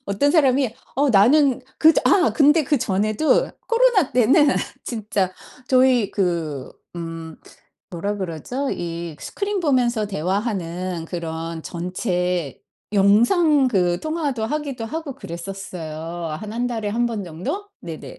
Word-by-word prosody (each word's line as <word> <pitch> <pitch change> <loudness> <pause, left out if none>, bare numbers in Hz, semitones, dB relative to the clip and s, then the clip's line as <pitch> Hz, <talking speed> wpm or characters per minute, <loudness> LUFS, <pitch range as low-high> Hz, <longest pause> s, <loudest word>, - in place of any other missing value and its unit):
어떤 200 +9 +2
사람이 270 -6 +3 0.2
어 285 +2 +3
"나는 255 +6 +5 0.2
그 320 +1 +7
전." - - +2
아 370 -3 +4
근데 295 0 +5
그 290 - +2
전에도 215 +8 +1 0.2
코로나 465 - +3
때는 260 +5 +5 0.4
진짜 210 -5 -2 0.4
저희 255 -4 +4
그 165 -8 -2 0.3
음 165 -1 -6 0.5
뭐라 200 +4 -3
그러죠? 195 - -4
이 170 -2 -5
스크린 405 0 -3
보면서 245 -8 +1
대화하는 185 -2 -2
그런 165 -1 -5
전체 180 - -2 0.3
영상 255 - +4
그 180 -6 +1
통화도 305 -7 -2
하기도 280 -3 -3
하고 300 +3 -5
그랬었어요. 180 - -7 0.5
한 215 0 -7
1 240 +2 -1
달에 225 -4 -3
1 240 +3 +1
번 220 -4 -3
정도? 180 - -5
네네. 165 -2 -8
215 Hz, 240 characters per minute, -22 LUFS, 175-275 Hz, 0.5 s, 그